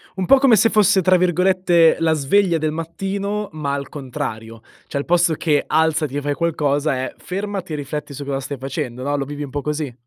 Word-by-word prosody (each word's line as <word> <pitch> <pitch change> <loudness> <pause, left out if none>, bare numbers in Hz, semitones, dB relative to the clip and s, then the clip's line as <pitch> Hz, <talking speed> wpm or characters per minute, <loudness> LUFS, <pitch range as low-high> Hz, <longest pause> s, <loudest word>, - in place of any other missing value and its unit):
Un 190 -1 -2
po' 275 - +6
come 260 -4 +5
se 215 +2 +4
fosse 205 -3 +4
tra 185 +1 +4
virgolette 180 -1 +3
“la 165 -1 +2
sveglia 170 +5 +2
del 155 -1 -1
mattino” 195 +6 -3
ma 150 -3 -3
al 140 0 -4
contrario, 120 -6 -6 0.3
cioè - - -4
al 140 - -2
posto 175 -1 +3
che 150 -2 +1
alzati 155 -2 +1
e - - -2
fai 145 0 -1
qualcosa 150 -3 0
è 130 0 -4
fermati 195 -2 -5
e - - -1
rifletti 145 0 -5
su 140 +1 -7
cosa 135 -1 -2
stai 140 +1 -6
facendo, 130 -1 -5
no, 145 +2 -1
lo 140 -1 -2
vivi 145 +1 -6
un 140 - -7
po' 145 +1 -3
così? 150 -2 -3
155 Hz, 215 wpm, -20 LUFS, 140-180 Hz, 0.3 s, po